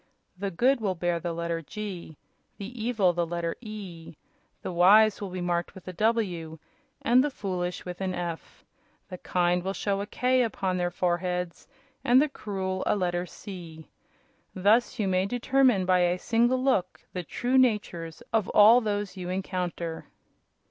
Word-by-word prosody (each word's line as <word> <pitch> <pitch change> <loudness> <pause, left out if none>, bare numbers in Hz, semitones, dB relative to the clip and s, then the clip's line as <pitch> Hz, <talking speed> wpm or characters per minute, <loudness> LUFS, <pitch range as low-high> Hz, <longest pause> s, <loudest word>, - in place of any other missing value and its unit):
The 200 +2 -3
good 245 +8 +2
will 195 -3 0
bear 175 0 -1
the 170 +1 -3
letter 170 0 -3
'G,' 180 -3 -7 0.4
the 220 +3 -7
evil 215 -7 +2
the 175 0 0
letter 170 0 -3
'E.' 195 -8 -9 0.5
The - - -3
wise 200 +5 +5
will 200 - -4
be 180 0 -5
marked 175 -1 -2
with 190 - -13
a 185 - -5
'W' 180 -6 -1 0.5
and 250 +2 +5
the 295 - 0
foolish 180 -7 -4
with 180 +1 -7
an 185 -1 -1
'F.' 170 -2 -6 0.4
The 180 -2 -7
kind 180 0 +1
will 190 +2 -3
show 200 -1 -1
a 205 - -5
'K' 255 +3 +2
upon 195 -5 -1
their 175 -1 0
foreheads 180 0 -2 0.4
and 255 -1 +5
the 300 - +3
cruel 190 -6 -4
a - - +3
letter 180 -2 -1
'C.' 170 -6 -10 0.7
Thus 210 +7 +3
you 210 -4 0
may 185 0 +1
determine 245 -3 +2
by 185 0 +3
a 175 0 +2
single 240 +6 +1
look 195 -9 0
the 180 - -2
true 245 +9 0
natures 200 -9 0
of 220 -4 +1
all 225 +4 +8
those 205 -3 -2
you 180 -2 -6
encounter." 180 -3 -3
185 Hz, 165 wpm, -27 LUFS, 175-215 Hz, 0.7 s, all